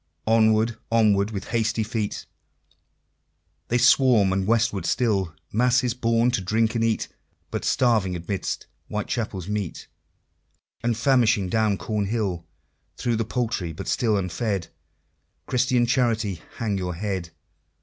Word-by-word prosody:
Onward, 110 Hz, 0 st, +3 dB
onward, 105 Hz, -3 st, +3 dB
with 100 Hz, -3 st, -6 dB
hasty 115 Hz, -1 st, 0 dB
feet, 110 Hz, -2 st, -3 dB, 1.4 s
They 120 Hz, -, +1 dB
swarm 125 Hz, -6 st, +5 dB
and 95 Hz, 0 st, -1 dB
westward 115 Hz, -5 st, +1 dB
still 100 Hz, -9 st, 0 dB, 0.2 s
Masses 125 Hz, +2 st, +2 dB
born 115 Hz, 0 st, +2 dB
to 120 Hz, -, 0 dB
drink 110 Hz, +4 st, +1 dB
and 115 Hz, -1 st, 0 dB
eat, 115 Hz, -1 st, 0 dB, 0.4 s
But -, -, -3 dB
starving 110 Hz, -8 st, +2 dB
amidst 90 Hz, +3 st, -3 dB, 0.2 s
Whitechapel's 105 Hz, -3 st, -3 dB
meat, 105 Hz, -4 st, -3 dB, 1.0 s
And 115 Hz, -1 st, 0 dB
famishing 115 Hz, -6 st, +3 dB
down 110 Hz, -1 st, +1 dB
Cornhill! 105 Hz, -5 st, -2 dB, 0.5 s
Through 120 Hz, -2 st, 0 dB
the 115 Hz, -, -1 dB
Poultry 110 Hz, -8 st, -2 dB
but -, -, -7 dB
still 110 Hz, -4 st, +1 dB
unfed 95 Hz, 0 st, -2 dB, 0.8 s
Christian 125 Hz, -1 st, +2 dB
Charity, 115 Hz, -7 st, 0 dB, 0.2 s
hang 105 Hz, -4 st, -1 dB
your 90 Hz, -2 st, -3 dB
head! 95 Hz, -2 st, -3 dB
110 Hz, 120 wpm, -24 LUFS, 100-115 Hz, 1.4 s, swarm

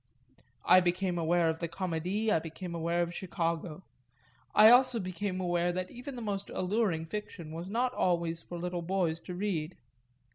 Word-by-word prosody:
I 185 Hz, -, +8 dB
became 180 Hz, 0 st, 0 dB
aware 170 Hz, +1 st, +2 dB
of 160 Hz, 0 st, -1 dB
the 170 Hz, -, -2 dB
Comédie, 185 Hz, +5 st, -2 dB
I 165 Hz, -, +4 dB
became 165 Hz, +2 st, -7 dB
aware 170 Hz, +1 st, 0 dB
of 170 Hz, 0 st, -4 dB
Chicago; 170 Hz, -1 st, -3 dB, 0.7 s
I 215 Hz, +2 st, +9 dB
also 250 Hz, -1 st, +5 dB
became 185 Hz, 0 st, -3 dB
aware 175 Hz, -1 st, +1 dB
that 185 Hz, +1 st, -4 dB
even 255 Hz, +2 st, -8 dB
the 240 Hz, -, -6 dB
most 200 Hz, -2 st, -3 dB
alluring 185 Hz, -4 st, 0 dB
fiction 170 Hz, -3 st, -6 dB
was 170 Hz, +3 st, -6 dB
not 245 Hz, +4 st, 0 dB
always 170 Hz, -4 st, 0 dB
for 175 Hz, -, -8 dB
little 175 Hz, 0 st, -3 dB
boys 170 Hz, -2 st, 0 dB
to 180 Hz, -, -7 dB
read. 180 Hz, -4 st, -2 dB
180 Hz, 170 wpm, -31 LUFS, 170-195 Hz, 0.7 s, I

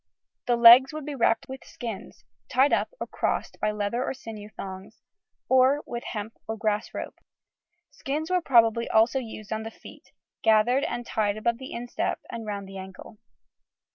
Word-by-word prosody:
The 240 Hz, -, +3 dB
legs 240 Hz, +4 st, +8 dB
would 310 Hz, -2 st, -6 dB
be 295 Hz, -, -4 dB
wrapped 230 Hz, -3 st, +1 dB
with 265 Hz, 0 st, -8 dB
skins, 225 Hz, -, -8 dB, 0.2 s
tied 270 Hz, +3 st, +3 dB
up -, -, +1 dB
or -, -, -3 dB
crossed -, -, -2 dB
by 215 Hz, -, +2 dB
leather 210 Hz, +3 st, -2 dB
or 270 Hz, -, -3 dB
sinew 215 Hz, -4 st, -9 dB
thongs, 195 Hz, +1 st, -9 dB, 0.5 s
or 260 Hz, +3 st, +4 dB
with 235 Hz, 0 st, -6 dB
hemp 215 Hz, 0 st, -5 dB
or 220 Hz, 0 st, -4 dB
grass 215 Hz, -1 st, -1 dB
rope. -, -, -7 dB, 0.7 s
Skins 310 Hz, +5 st, -4 dB
were 365 Hz, -1 st, +2 dB
probably 230 Hz, -5 st, +3 dB
also 225 Hz, +4 st, +3 dB
used 220 Hz, -3 st, -7 dB
on 220 Hz, -, -3 dB
the 220 Hz, -, -6 dB
feet, -, -, -15 dB, 0.3 s
gathered 225 Hz, +5 st, +3 dB
and 240 Hz, -, -4 dB
tied 210 Hz, -2 st, -1 dB
above 235 Hz, +2 st, -1 dB
the 260 Hz, -, -8 dB
instep 240 Hz, +1 st, -3 dB
and 225 Hz, -2 st, -6 dB
round 200 Hz, -2 st, -4 dB
the 195 Hz, 0 st, -9 dB
ankle. 190 Hz, +3 st, -11 dB
230 Hz, 170 wpm, -26 LUFS, 215-260 Hz, 0.7 s, legs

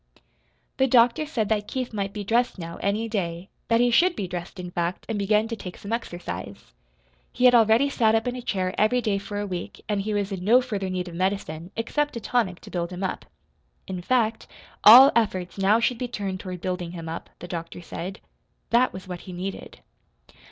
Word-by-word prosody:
The 265 Hz, -, +3 dB
doctor 245 Hz, +4 st, +4 dB
said 230 Hz, -9 st, -1 dB
that 210 Hz, -2 st, 0 dB
Keith 255 Hz, -3 st, -4 dB
might 200 Hz, -2 st, -2 dB
be 205 Hz, 0 st, -5 dB
dressed 235 Hz, +4 st, +1 dB
now, 170 Hz, -1 st, -7 dB
any 210 Hz, +3 st, -1 dB
day 180 Hz, -4 st, -3 dB, 0.2 s
that 230 Hz, 0 st, +3 dB
he 245 Hz, 0 st, +3 dB
should 345 Hz, +8 st, +4 dB
be 195 Hz, -, -3 dB
dressed, 175 Hz, +1 st, -6 dB
in 180 Hz, -1 st, -6 dB
fact, 175 Hz, +1 st, -2 dB
and 225 Hz, -3 st, -2 dB
begin 210 Hz, +2 st, +2 dB
to 230 Hz, -, -2 dB
take 180 Hz, -4 st, -8 dB
some 200 Hz, +3 st, -6 dB
exercise. 100 Hz, -, -6 dB, 0.6 s
He 250 Hz, -, +1 dB
had 250 Hz, -, +8 dB
already 230 Hz, +3 st, +5 dB
sat 225 Hz, -5 st, +2 dB
up 225 Hz, -, +1 dB
in 245 Hz, -, -1 dB
a 250 Hz, -, -5 dB
chair 185 Hz, -5 st, -1 dB
every 215 Hz, +4 st, +3 dB
day 210 Hz, -5 st, 0 dB
for 205 Hz, +1 st, -5 dB
a 205 Hz, -, -2 dB
week 180 Hz, -3 st, -6 dB
and 205 Hz, -1 st, 0 dB
he 210 Hz, +1 st, -2 dB
was 205 Hz, 0 st, -1 dB
in 190 Hz, -2 st, -4 dB
no 230 Hz, +6 st, +6 dB
further 205 Hz, -7 st, -3 dB
need 185 Hz, -1 st, -3 dB
of 175 Hz, -, -8 dB
medicine, 180 Hz, -2 st, -2 dB
except 295 Hz, +6 st, -1 dB
a -, -, -3 dB
tonic 215 Hz, -5 st, 0 dB
to -, -, -12 dB
build 170 Hz, -1 st, -2 dB
him 180 Hz, +1 st, -6 dB
up. 190 Hz, -, -3 dB, 0.6 s
In 185 Hz, -1 st, -5 dB
fact, 225 Hz, +1 st, 0 dB, 0.4 s
all 255 Hz, +6 st, +11 dB
efforts 195 Hz, -5 st, 0 dB
now 200 Hz, +3 st, +4 dB
should 240 Hz, 0 st, 0 dB
be 250 Hz, -, -2 dB
turned 195 Hz, -5 st, -4 dB
toward 185 Hz, -3 st, -7 dB
building 180 Hz, -2 st, -3 dB
him 165 Hz, -2 st, -7 dB
up, 165 Hz, +1 st, -6 dB
the 175 Hz, -, -9 dB
doctor 165 Hz, -1 st, -6 dB
said. 185 Hz, +4 st, -6 dB, 0.5 s
That 245 Hz, +2 st, +4 dB
was 185 Hz, 0 st, -9 dB
what 180 Hz, -2 st, -6 dB
he -, -, -6 dB
needed. 190 Hz, +2 st, -6 dB
200 Hz, 215 wpm, -25 LUFS, 180-230 Hz, 0.6 s, all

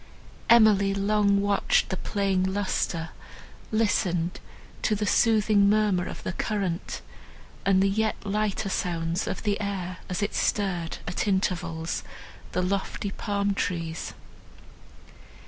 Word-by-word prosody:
Emily 210 Hz, -4 st, +6 dB
long 200 Hz, 0 st, +2 dB
watched 200 Hz, 0 st, +2 dB
the 190 Hz, -, -1 dB
playing 195 Hz, -1 st, 0 dB
lustre, 190 Hz, -3 st, -1 dB, 0.6 s
listened 180 Hz, -6 st, +1 dB, 0.4 s
to 215 Hz, -, +2 dB
the 210 Hz, +1 st, -1 dB
soothing 210 Hz, -2 st, +4 dB
murmur 205 Hz, -4 st, +2 dB
of -, -, -7 dB
the -, -, -3 dB
current, 195 Hz, -4 st, -2 dB, 0.7 s
and 190 Hz, -1 st, +5 dB
the -, -, +4 dB
yet 215 Hz, +2 st, +1 dB
lighter 210 Hz, 0 st, -1 dB
sounds 170 Hz, -1 st, -1 dB
of -, -, -3 dB
the 210 Hz, 0 st, 0 dB
air, 185 Hz, -3 st, -3 dB
as 185 Hz, +3 st, -1 dB
it 205 Hz, -, -1 dB
stirred, 180 Hz, -5 st, 0 dB
at 180 Hz, +3 st, -2 dB
intervals, 175 Hz, -4 st, -1 dB, 0.5 s
the 180 Hz, -, +1 dB
lofty 195 Hz, +1 st, -2 dB
palm 200 Hz, -1 st, -1 dB
trees. 165 Hz, -4 st, -3 dB
195 Hz, 120 wpm, -26 LUFS, 180-205 Hz, 0.7 s, Emily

